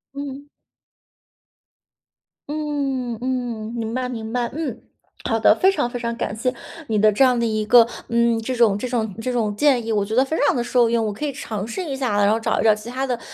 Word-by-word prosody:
嗯。 280 0 -7 2.0
嗯， 280 -5 -2
嗯， 240 -3 -3
明 225 -1 -3
白 255 0 -1
明 225 -3 -6
白， 240 0 0
嗯， 315 +2 -4 0.4
好 225 -2 0
的。 - - +5
非 380 +1 +4
常 245 - -1
非 245 0 -5
常 235 0 -3
感 215 - -3
谢 250 +3 -1 0.3
你 215 -2 +1
的 215 0 +5
这 240 +7 +3
样 250 -2 +4
的 - - 0
一 215 -1 -1
个， 230 +1 +7 0.2
嗯， 235 0 +2
这 250 +3 -3
种 225 -5 +3
这 250 +5 -4
种 220 -5 -2
这 250 +2 -2
种 215 -4 0
建 260 -1 +3
议， 225 - -3
我 205 -2 +1
觉 220 +2 -3
得 260 - +5
非 315 +4 -2
常 - - +2
地 240 - 0
受 240 -1 +3
用。 230 0 +1
我 210 - -1
可 255 +9 -4
以 290 - -1
尝 215 -5 -5
试 360 +11 -4
一 285 -5 -4
下， 255 -6 -1
然 200 - +4
后 220 - +1
找 225 - 0
一 - - -1
找 215 -2 +5
其 215 +2 -11
它 260 +2 -3
的 245 -2 -2
235 Hz, 245 characters per minute, -22 LUFS, 220-260 Hz, 2.0 s, 个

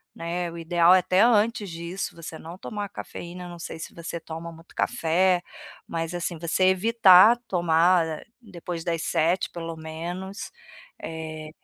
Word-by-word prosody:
né, 170 +1 -3
o 170 - -9
ideal 170 +1 +4
é 185 - +6
até 185 +2 +2
antes 225 -2 +3
disso, 170 +3 -5
você 165 -1 -8
não 165 +2 -9
tomar 205 +1 -5
cafeína, 175 0 -8
não 175 - -9
sei 165 - -7
se - - -8
você 170 0 -5
toma 165 +1 -7
muito 165 +1 -16
café, 180 +2 +2 0.5
mas 165 0 -3
assim, 175 -1 -3
você 170 +3 +1
evitar 195 +2 +7
tomar 170 -2 +2 0.2
depois 175 -5 -7
das 165 -2 -1
19:00, 170 +2 +1
pelo 165 -1 -6
menos. 175 +5 -6 0.5
É 155 -1 -6
170 Hz, 150 wpm, -25 LUFS, 165-185 Hz, 0.5 s, evitar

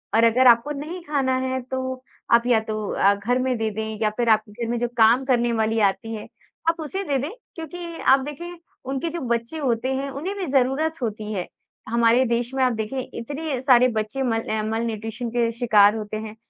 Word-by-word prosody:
और 225 - +5
अगर 240 +3 +5
आपको 235 +4 +5
नहीं 335 +5 -6
खाना 275 -4 0
है 260 0 -2
तो 260 0 -4 0.3
आप 235 +1 +5
या 240 -3 +4
तो 215 -1 -4
अ, 200 +1 +4
घर 220 +5 -1
में 255 0 0
दे 220 -1 -1
दें 220 +1 -4
या 215 - +3
फ़िर 240 -1 +1
आपके 215 -1 +3
घर - - -5
में 240 - 0
जो 240 +1 0
काम 235 +4 +5
करने 240 -2 +2
वाली 225 0 +1
आती 225 +3 -6
है 210 - -8 0.4
आप 335 0 -1
उसे 380 +6 -3
दे 285 -6 0
दें 280 +5 -3 0.2
क्योंकि 335 +1 -7
आप 270 - +5
देखें 340 +4 -7 0.4
उनके 275 +5 -2
जो 340 +1 -4
बच्चे 235 +7 -4
होते 260 -3 0
हैं 275 +1 -3
उन्हें 310 +9 -4
भी 380 - -2
ज़रूरत 275 +4 +1
होती 215 -2 -3
है। 185 -3 -3 0.4
हमारे 235 +2 +4
देश 235 +1 -1
में 265 -1 +1
आप 250 -1 +3
देखें 220 +4 -3 0.2
इतने 285 +3 -4
सारे 255 -2 +5
बच्चे 240 +6 -3
मल 225 -3 0
अ, 220 0 0
मल्नूट्रिशन 225 +1 -3
के 235 -1 +1
शिकार 220 -3 +4
होते 215 -1 -4
हैं, 215 0 -7
245 Hz, 210 wpm, -23 LUFS, 225-270 Hz, 0.4 s, और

